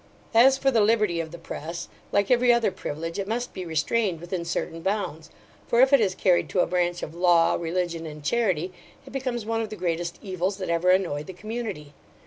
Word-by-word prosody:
As 260 +4 +6
for 270 0 +2
the 230 -4 +3
liberty 210 -5 +2
of 165 -1 -3
the 170 - -9
press, 165 +1 -6 0.2
like 200 +2 +2
every 245 0 +5
other 235 -4 +3
privilege, 165 -1 -5
it 195 - -3
must 240 +3 -3
be 185 -2 -6
restrained 170 +3 0
within 175 +1 -4
certain 165 -1 -3
bounds; 190 -4 -2 0.4
for 235 - +2
if 265 +2 +6
it 275 - +7
is 190 -3 +1
carried 180 -2 +2
to 185 - +2
a - - +3
branch 175 0 0
of 155 - -5
law, 170 -1 +4
religion, 170 -1 -2
and 150 -1 -9
charity, 185 -3 0 0.3
it 265 - -12
becomes 250 -4 -3
one 225 0 -1
of 220 - -4
the 215 - -6
greatest 170 -2 -2
evils 190 0 -2
that 185 -3 -4
ever 170 +2 +2
annoyed 175 -6 +1
the 190 - -7
community. 205 -7 -6
185 Hz, 210 wpm, -25 LUFS, 170-225 Hz, 0.4 s, it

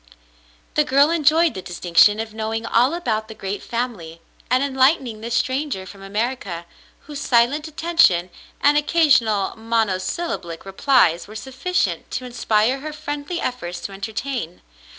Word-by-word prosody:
The 300 - +3
girl 280 +2 +4
enjoyed 325 +1 +3
the 190 - -6
distinction 180 +4 +3
of 220 -1 -5
knowing 220 +1 -3
all 250 +7 +2
about 220 -11 -2
the 220 - -10
great 195 0 -5
family 220 -10 -4 0.3
and 255 +2 +3
enlightening 265 -4 +1
this 235 +1 -3
stranger 260 -7 -1
from 195 +1 -12
America, 200 -4 -3 0.4
whose 290 -1 -8
silent 255 +6 +2
attention 310 - +2 0.3
and 290 +1 +5
occasional 275 - +2
monosyllablic 220 - -2
replies 195 - +2
were 215 - -11
sufficient 265 - -2
to 255 - -4
inspire 240 +1 +1
her 305 +2 -6
friendly 295 +2 -5
efforts 175 -9 -4
to 200 - -6
entertain. 215 -1 -5
235 Hz, 135 wpm, -21 LUFS, 200-285 Hz, 0.4 s, and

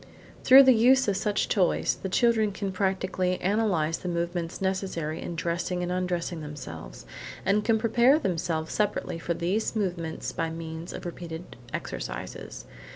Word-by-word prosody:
Through 270 +1 +9
the 260 -1 +7
use 255 +3 +5
of 200 - +2
such 205 +1 0
toys, 185 -4 +1
the 190 - -3
children 220 0 +3
can 195 0 -3
practically 185 -1 0
analyse 180 -6 +1
the 180 - -5
movements 170 0 -2
necessary 190 -5 -2
in 170 - -5
dressing 175 +1 -2
and 175 - -2
undressing 180 -2 -2
themselves, 80 - -8 0.4
and 200 +2 +2
can 225 0 +3
prepare 235 +5 +4
themselves 170 - -2
separately 210 -5 -1
for 170 +1 -2
these 195 +8 -1
movements 175 -6 -2
by 165 - -2
means 160 +1 -6
of - - -8
repeated 170 0 -7 0.2
exercises. - - -6
180 Hz, 150 wpm, -27 LUFS, 165-205 Hz, 0.4 s, Through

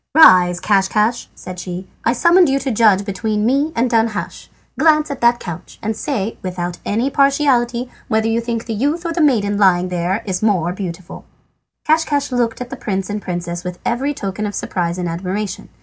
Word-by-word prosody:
"Rise, 180 - +7
Caschcasch," 210 +4 +1
said 185 -1 -8
she. 180 +1 -6 0.2
"I 235 - +2
summoned 340 +5 +4
you 270 - +2
to 270 -1 -2
judge 210 -3 +3
between 210 +1 -1
me 280 +6 +1
and 235 +2 +2
Danhasch. 225 -3 -1 0.3
Glance 305 -2 +3
at 280 - -6
that 240 0 +4
couch, 175 -1 -8
and 220 +1 -1
say 225 -4 -3
without 180 -1 -4
any 235 +7 -1
partiality 260 -4 +2 0.2
whether 220 0 +1
you 225 +1 +1
think 230 -1 -3
the 230 - -3
youth 290 - -1
or 335 - -1
the 335 - 0
maiden 205 -9 +2
lying 185 -2 +3
there 180 +5 -1
the 185 -3 -2
more 180 -5 +1
beautiful." 180 -2 -7 0.6
Caschcasch 300 -3 +1
looked 240 -1 -1
at 250 - -6
the - - -4
prince 195 -3 -3
and 210 0 -3
princess 175 -1 -4
with 180 -1 -5
every 275 +4 -1
token 200 0 -3
of 205 - -6
surprise 175 -1 -2
and 180 -1 -2
admiration. 185 +3 -4
215 Hz, 185 wpm, -18 LUFS, 185-255 Hz, 0.6 s, Rise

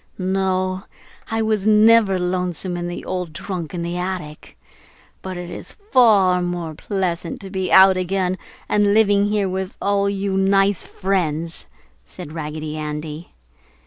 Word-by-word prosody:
"No, 185 0 -1 0.4
I 225 0 0
was 215 -2 0
never 215 -2 +5
lonesome 180 0 -2
in 175 0 -3
the 175 - -6
old 180 -4 -4
trunk 180 -3 -5
in 170 - -3
the 170 +1 -3
attic, 180 -5 -6 0.6
but 185 -1 -6
it 175 0 -7
is - - -8 0.2
far 200 -7 +5
more 175 -2 -3
pleasant 175 -1 -3
to 195 -1 -9
be 190 -2 -2
out 190 0 +7
again 185 0 -1 0.3
and 205 0 +3
living 205 -2 +4
here 205 -1 +1
with 190 +1 -4
all 200 0 +1
you 195 -1 -2
nice 195 0 +3
friends!" 170 -4 -2 0.4
said 175 -5 -10
Raggedy 155 -1 -5
Andy. 150 +1 -6
185 Hz, 145 wpm, -21 LUFS, 175-195 Hz, 0.6 s, out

